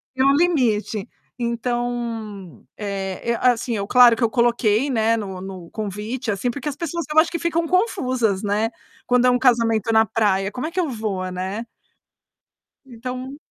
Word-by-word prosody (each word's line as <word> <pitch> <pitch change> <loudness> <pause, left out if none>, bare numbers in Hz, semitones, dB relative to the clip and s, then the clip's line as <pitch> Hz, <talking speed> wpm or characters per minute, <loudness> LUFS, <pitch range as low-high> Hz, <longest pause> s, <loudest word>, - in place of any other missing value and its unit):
Tem 260 +1 +2
um 275 +1 +5
limite. 240 - +1 0.3
Então, 235 - -3
eh, 200 +2 -3
assim, 245 -1 +2
eu 200 -1 -2
claro 245 0 +7
que 235 - -6
eu 230 - +4
coloquei, 235 +1 +2
né, 225 -2 +2
no 195 -4 -5
no 185 -3 -8
convite, 215 +4 -4
assim, 205 +4 -1
porque 280 +3 -5
as 285 - -4
pessoas, 335 0 -3
eu - - +4
acho 320 +1 +5
que 335 - -3
ficam 335 0 0
confusas, 260 - +1
né, 210 +2 +1 0.4
quando 250 0 +3
é - - +6
um 250 - +3
casamento 230 -4 +2
na 220 0 +5
praia: 200 -2 0
"Como 250 +6 -4
é 325 - -4
que 360 - -6
eu 330 -5 -1
vou?", 205 -6 -3
né. 190 +5 -4 1.2
Então 255 +2 -7
235 Hz, 170 wpm, -22 LUFS, 210-255 Hz, 1.2 s, claro